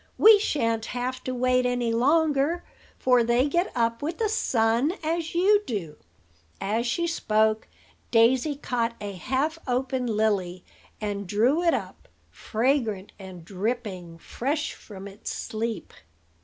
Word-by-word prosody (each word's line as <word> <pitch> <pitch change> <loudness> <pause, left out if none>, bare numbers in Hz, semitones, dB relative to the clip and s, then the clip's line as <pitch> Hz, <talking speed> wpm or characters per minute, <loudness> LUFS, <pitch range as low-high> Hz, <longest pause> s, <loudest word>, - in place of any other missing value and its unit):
We 435 -1 +8
shan't 230 - 0
have 255 +1 -3
to 255 - -2
wait 255 0 +2
any 245 -2 0
longer; 300 +5 +2 0.3
for 250 -2 +4
they 240 +4 +2
get 345 +6 0
up 230 -1 0
with 320 +3 -3
the 440 -2 0
sun, 240 - +1
as 325 +1 -2
you 405 +4 +4
do." 170 -10 -4 0.6
As 225 +4 -1
she 340 +8 0
spoke, 220 -9 +1 0.4
Daisy 245 +5 +3
caught 235 -4 -2
a 205 -1 -5
half 265 - -1
open 255 0 -1
lily, 205 -5 0 0.3
and 205 -2 -3
drew 235 - +2
it 340 -1 +3
up, - - -7 0.2
fragrant 225 -4 -1
and 185 -3 -10
dripping, 190 -4 -4
fresh 285 - -3
from 200 -2 -10
its 200 +1 -7
sleep. 225 0 -4
240 Hz, 135 wpm, -26 LUFS, 215-285 Hz, 0.6 s, We